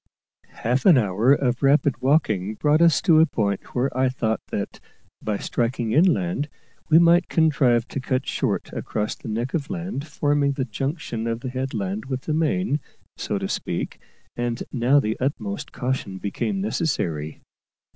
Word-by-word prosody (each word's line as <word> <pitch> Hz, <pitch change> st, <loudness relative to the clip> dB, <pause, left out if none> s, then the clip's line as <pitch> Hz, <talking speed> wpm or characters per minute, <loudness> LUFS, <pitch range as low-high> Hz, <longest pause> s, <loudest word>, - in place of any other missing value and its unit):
Half 125 Hz, -, 0 dB
an 170 Hz, -7 st, +8 dB
hour 110 Hz, +2 st, +2 dB
of 130 Hz, -3 st, +2 dB
rapid 140 Hz, -2 st, +3 dB
walking 110 Hz, -, +1 dB
brought 150 Hz, +6 st, +2 dB
us 170 Hz, -2 st, +4 dB
to 160 Hz, -3 st, +6 dB
a 160 Hz, -, +6 dB
point 100 Hz, -7 st, -2 dB
where 125 Hz, +1 st, 0 dB
I 130 Hz, 0 st, +2 dB
thought 110 Hz, -4 st, -1 dB
that, -, -, -4 dB, 0.4 s
by 105 Hz, -1 st, -1 dB
striking 120 Hz, 0 st, -1 dB
inland, 145 Hz, -, +2 dB, 0.4 s
we 160 Hz, -, +7 dB
might 170 Hz, +1 st, +5 dB
contrive 135 Hz, -7 st, +3 dB
to -, -, -3 dB
cut 130 Hz, 0 st, -1 dB
short -, -, -2 dB
across 105 Hz, -1 st, -2 dB
the -, -, -11 dB
neck 115 Hz, +4 st, -2 dB
of 150 Hz, -4 st, -2 dB
land 175 Hz, -5 st, -4 dB
forming 145 Hz, -1 st, +1 dB
the 135 Hz, -1 st, -2 dB
junction 135 Hz, -, -3 dB
of 115 Hz, 0 st, -2 dB
the 130 Hz, -, -4 dB
headland 110 Hz, -6 st, -3 dB
with 130 Hz, -1 st, -3 dB
the 155 Hz, -, -3 dB
main, 160 Hz, 0 st, +1 dB, 0.4 s
so -, -, -2 dB
to -, -, -3 dB
speak; -, -, -3 dB, 0.4 s
and 120 Hz, -1 st, -2 dB
now 130 Hz, +3 st, +3 dB
the 110 Hz, -4 st, -2 dB
utmost 110 Hz, -7 st, -3 dB
caution 125 Hz, -6 st, -3 dB
became 150 Hz, -, -2 dB
necessary. 85 Hz, -, -2 dB
130 Hz, 160 wpm, -23 LUFS, 110-150 Hz, 0.4 s, an